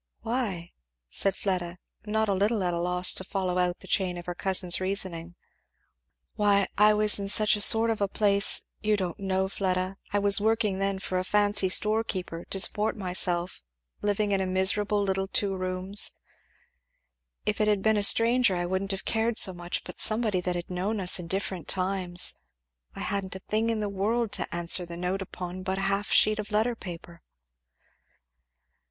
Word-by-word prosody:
"Why?" 220 -8 -3 0.4
said 195 -1 -1
Fleda, 180 -3 -3 0.3
not 220 +1 0
a 200 - +1
little 205 +2 0
at 175 -1 -1
a 170 - -2
loss 180 +1 +2
to - - -4
follow 185 -1 -2
out 180 0 -1
the - - -12
chain 185 -2 0
of 175 - -9
her 180 - -4
cousin's 185 -1 +2
reasoning. 185 -3 -2 1.0
"Why 205 -2 +2
I 210 +1 +4
was 210 0 +3
in 200 - -4
such 210 +1 +3
a 210 - -2
sort 225 +2 +5
of 220 - -4
a 200 - +2
place 200 0 +1 0.2
you 210 0 +1
don't 185 0 -4
know, 190 -1 -1
Fleda; 185 -1 -2
I 205 - 0
was 200 0 +2
working 215 -3 0
then 195 0 -1
for 185 -1 -3
a - - -2
fancy 205 0 +1
store 215 +4 +3
keeper, 180 -5 -6
to 195 - -2
support 210 +3 +1
myself 180 -2 -3 0.4
living 205 0 -1
in 195 -1 +1
a 190 - -2
miserable 205 +2 +2
little 195 0 -1
two 195 0 0
rooms. 185 +2 +1 1.3
If 210 0 -1
it 210 - +2
had 205 -2 +1
been 220 0 +3
a - - +1
stranger 230 0 +5
I 175 0 -2
wouldn't 190 +2 -3
have 195 -1 -4
cared 225 0 0
so 190 - +7
much, 175 0 -5
but - - -5
somebody 215 -4 +2
that 180 0 -3
had 175 +1 -6
known 195 +4 -2
us 180 -1 +2
in 175 - -7
different 190 -1 -4
times 185 -2 +1 0.6
I - - -7
hadn't 195 -2 -3
a - - -6
thing 220 +4 -1
in 225 -2 -1
the 210 - -2
world 210 +3 -1
to - - -2
answer 175 +1 +3
the 170 -1 -8
note 180 +2 -3
upon 180 -1 -7
but 190 0 -3
a - - -2
half 195 +1 -1
sheet 215 0 +4
of 210 +1 -6
letter 220 +3 +1
paper." 170 -4 -10
195 Hz, 190 wpm, -26 LUFS, 185-210 Hz, 1.3 s, so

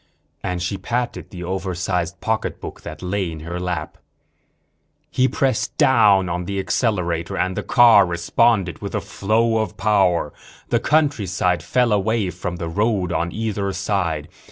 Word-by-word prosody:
And 90 -1 -2
she 95 +2 -3
patted 110 -5 -3
the 90 -2 -8
oversized 90 -1 -2
pocketbook 110 -1 -3
that - - -9
lay 90 -1 -1
in 80 -1 -8
her 85 +2 -5
lap. 90 -4 -4 1.1
He 130 - +3
pressed 135 0 -1
down 105 -7 +5
on 90 +1 -3
the 100 +2 -3
accelerator 95 -4 -1
and 95 0 0
the - - -2
car 120 -5 +6
responded 90 +1 +1
with - - -5
a - - +1
flow 110 +3 0
of 110 -4 -3
power. 95 -5 +2 0.4
The - - +2
countryside 100 - +1
fell 120 +7 +1
away 105 -1 +1
from 90 0 -5
the 85 -1 -5
road 95 0 0
on 85 +1 -1
either 105 -2 -2
side. 85 -9 -1
95 Hz, 150 wpm, -21 LUFS, 90-110 Hz, 1.1 s, car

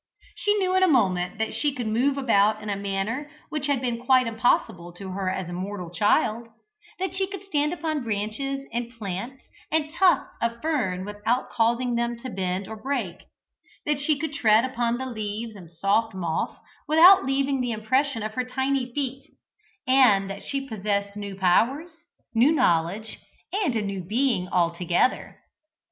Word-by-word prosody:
She 415 0 +1
knew 375 -2 +1
in 375 - +4
a 375 - +6
moment 190 - +2
that 220 0 -2
she 290 -2 0
could 245 -3 -3
move 250 +6 +1
about 215 -5 +3
in 210 - -3
a - - 0
manner 200 +8 -3 0.2
which 300 -2 -3
had 280 -3 +1
been 240 -2 -2
quite 255 0 +4
impossible 225 -6 0
to 190 +1 -8
her 190 0 -2
as 185 -1 -3
a 175 - -6
mortal 185 -1 -5
child: 215 +4 +1 0.5
that 380 +1 -3
she 380 0 0
could 395 -1 -8
stand 300 -6 0
upon 315 -4 -2
branches 235 +6 -3
and 235 0 -2
plants 230 +3 -6 0.3
and 310 -1 0
tufts 365 0 +3
of 235 0 -1
fern 210 - -1
without 210 +5 -2
causing 235 +2 +1
them 235 0 -1
to 255 - -6
bend 185 0 -2
or 220 - -6
break, 245 -10 -2 0.7
that 295 -1 0
she 295 +1 +1
could 305 0 -4
tread 225 -4 +4
upon 240 -2 -1
the 260 - -4
leaves 220 -2 -4
and 180 -5 -12
soft 195 +6 0
moss 170 -4 -2 0.3
without 340 +5 +8
leaving 270 0 0
the 245 -1 -1
impression 240 +3 0
of 215 0 -4
her 255 - -1
tiny 265 0 -1
feet, 275 +1 -3 0.6
and 220 -7 +5
that 195 - -7
she 275 -1 -4
possessed 200 -3 -2
new 200 -1 -6
powers, 235 - +2 0.4
new 240 +6 +5
knowledge, 210 - +1 0.3
and 380 - 0
a 220 - 0
new 200 -2 -3
being 215 -1 0
altogether. 175 +5 0
235 Hz, 170 wpm, -25 LUFS, 200-275 Hz, 0.7 s, without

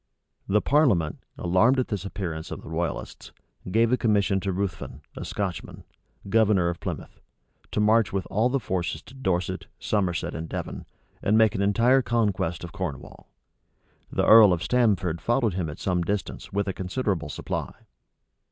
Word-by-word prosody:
The 105 +2 +3
parliament, 115 - +2 0.2
alarmed 95 +10 +3
at 130 - 0
this 100 -3 -3
appearance 85 -5 -5
of - - -7
the - - -9
royalists, 80 +1 -4 0.4
gave 115 +4 +3
a - - +4
commission 100 -4 +2
to 95 0 -2
Ruthven, 90 -7 -4
a - - -6
Scotchman, 95 -5 -4 0.4
governor 100 -4 +3
of 85 - -4
Plymouth, - - -6 0.5
to - - -2
march 110 +1 +4
with 95 -1 -2
all 110 +5 +2
the 135 +1 +1
forces 90 -7 -3
to - - -15
Dorset. 95 -10 -2
Somerset, 95 -5 -1
and 80 0 -5
Devon, - - -5 0.3
and 105 +2 +3
make 110 -2 +5
an 95 - -2
entire 115 +7 +4
conquest 95 -8 0
of 85 - -7
Cornwall. 90 -9 -6 0.8
The - - +1
earl 110 -4 +8
of 85 -1 -2
Stamford 100 -9 +1
followed 120 -3 +1
him 90 -3 -2
at 75 - -7
some 90 -2 0
distance 100 +3 -3
With 100 +1 -1
a 95 - -1
considerable 95 -4 -2
supply. - - -4
100 Hz, 160 wpm, -26 LUFS, 90-110 Hz, 0.8 s, earl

